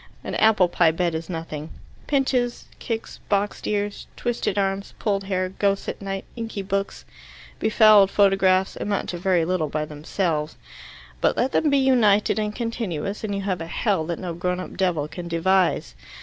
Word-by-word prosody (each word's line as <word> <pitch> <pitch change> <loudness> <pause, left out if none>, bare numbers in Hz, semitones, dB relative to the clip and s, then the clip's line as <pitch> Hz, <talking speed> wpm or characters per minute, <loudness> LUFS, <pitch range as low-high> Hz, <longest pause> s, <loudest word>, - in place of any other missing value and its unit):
An - - -5
apple 215 -4 +4
pie 170 -1 +3
bed 170 +1 0
is 160 +1 -4
nothing; 160 -3 -5 0.4
pinches, 260 -4 0
kicks, 225 -1 -5
boxed 205 0 0
ears, 205 0 -2
twisted 240 -3 -1
arms, 195 0 -1
pulled 200 -2 -1
hair, 185 -1 -1
ghosts 200 +1 0
at - - -5
night, 195 -1 -4
inky 225 -4 -5
books, 195 +1 -3 0.5
befouled 215 -3 +6
photographs, 195 -2 +3
amount 205 -1 -2
to 175 - -4
very 180 -2 +2
little 170 -3 0
by 155 +1 -2
themselves. 155 +1 -2 0.6
But - - +2
let 260 +2 +1
them 310 - +2
be 280 - +3
united 225 -6 +3
and 210 0 -2
continuous, 215 -5 -3
and 205 -2 -2
you 200 - -2
have 190 -3 -2
a 165 - -5
hell 190 -1 0
that 170 -1 -2
no 175 -2 -5
grown 180 +2 -2
up 185 - -7
devil 175 -6 0
can 170 +3 -7
devise. 175 - +1
195 Hz, 170 wpm, -24 LUFS, 175-210 Hz, 0.6 s, befouled